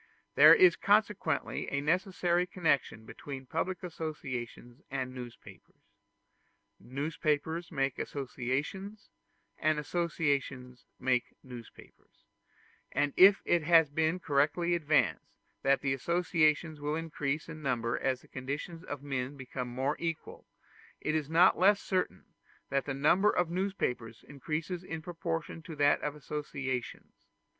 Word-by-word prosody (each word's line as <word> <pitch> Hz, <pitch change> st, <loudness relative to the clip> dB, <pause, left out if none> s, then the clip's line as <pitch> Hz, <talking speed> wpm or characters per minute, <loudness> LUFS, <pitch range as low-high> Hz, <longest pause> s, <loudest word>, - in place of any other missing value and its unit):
There -, -, +9 dB
is 180 Hz, -1 st, +6 dB
consequently 210 Hz, 0 st, +1 dB
a 140 Hz, -, 0 dB
necessary 180 Hz, +2 st, +1 dB
connection 140 Hz, -11 st, 0 dB
between 135 Hz, +2 st, -8 dB
public 170 Hz, +6 st, -3 dB
associations 135 Hz, -7 st, -6 dB
and 130 Hz, -1 st, -3 dB
newspapers: 125 Hz, -2 st, -12 dB, 0.9 s
newspapers 155 Hz, +4 st, -2 dB
make 135 Hz, -4 st, -1 dB
associations, 145 Hz, -, -4 dB, 0.5 s
and 155 Hz, 0 st, +2 dB
associations 145 Hz, -6 st, -2 dB
make 125 Hz, -1 st, 0 dB
newspapers; 120 Hz, -3 st, -14 dB, 0.7 s
and 145 Hz, +1 st, 0 dB
if 195 Hz, +1 st, +7 dB
it 175 Hz, -, +3 dB
has 160 Hz, -2 st, +5 dB
been 160 Hz, +4 st, +1 dB
correctly 155 Hz, +3 st, +1 dB
advanced 155 Hz, -3 st, +1 dB, 0.3 s
that 140 Hz, +1 st, +2 dB
associations 155 Hz, +2 st, +1 dB
will 150 Hz, +1 st, -1 dB
increase 155 Hz, -2 st, -3 dB
in 160 Hz, -1 st, -8 dB
number 120 Hz, -4 st, 0 dB
as 130 Hz, -1 st, -1 dB
the -, -, -20 dB
conditions 145 Hz, +6 st, -5 dB
of 145 Hz, -5 st, -6 dB
men 135 Hz, 0 st, -3 dB
become 130 Hz, -1 st, -5 dB
more 130 Hz, +4 st, -1 dB
equal, 165 Hz, -2 st, -5 dB, 0.5 s
it 155 Hz, -, -2 dB
is 155 Hz, -2 st, -1 dB
not 170 Hz, +3 st, +5 dB
less 200 Hz, +2 st, +5 dB
certain 185 Hz, -, -2 dB, 0.5 s
that 140 Hz, 0 st, +1 dB
the 140 Hz, -, -3 dB
number 170 Hz, +9 st, +4 dB
of 175 Hz, -4 st, +1 dB
newspapers 145 Hz, -, -2 dB
increases 155 Hz, +5 st, -4 dB
in 165 Hz, -3 st, -6 dB
proportion 165 Hz, -1 st, -4 dB
to 165 Hz, -1 st, -9 dB
that 145 Hz, 0 st, +3 dB
of 150 Hz, 0 st, -3 dB
associations. 135 Hz, -4 st, -5 dB
150 Hz, 120 wpm, -31 LUFS, 135-170 Hz, 0.9 s, There